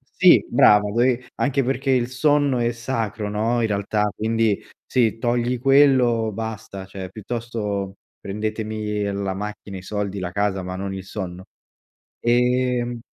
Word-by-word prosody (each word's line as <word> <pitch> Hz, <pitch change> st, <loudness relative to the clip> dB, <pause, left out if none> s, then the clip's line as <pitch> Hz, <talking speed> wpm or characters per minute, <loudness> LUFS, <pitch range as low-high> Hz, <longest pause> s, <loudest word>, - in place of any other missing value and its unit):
sì, -, -, +6 dB
brava 105 Hz, 0 st, +5 dB
dove 120 Hz, +2 st, +1 dB
anche 140 Hz, 0 st, +2 dB
perché 135 Hz, +2 st, -1 dB
il 125 Hz, -2 st, +2 dB
sonno 140 Hz, 0 st, +2 dB
è 120 Hz, 0 st, +1 dB
sacro, 115 Hz, -3 st, -3 dB
no, 110 Hz, +3 st, 0 dB
in 115 Hz, -, +2 dB
realtà 105 Hz, 0 st, 0 dB
quindi, 110 Hz, -1 st, 0 dB, 0.2 s
se 115 Hz, -3 st, +1 dB
togli 120 Hz, +1 st, 0 dB
quello 130 Hz, -4 st, +4 dB
basta 110 Hz, -2 st, -6 dB
cioè 95 Hz, -1 st, -7 dB
piuttosto 105 Hz, -2 st, -4 dB, 0.2 s
prendetemi 105 Hz, +1 st, -3 dB
la 100 Hz, -1 st, -2 dB
macchina, 105 Hz, 0 st, -6 dB
i -, -, -8 dB
soldi, 100 Hz, 0 st, -3 dB
la 90 Hz, -1 st, -4 dB
casa, 100 Hz, 0 st, 0 dB
ma 90 Hz, 0 st, -5 dB
non 95 Hz, 0 st, -4 dB
il 95 Hz, -1 st, -6 dB
sonno, 95 Hz, -2 st, -6 dB, 0.8 s
ehm 125 Hz, 0 st, +1 dB
110 Hz, 140 wpm, -22 LUFS, 100-120 Hz, 0.8 s, sì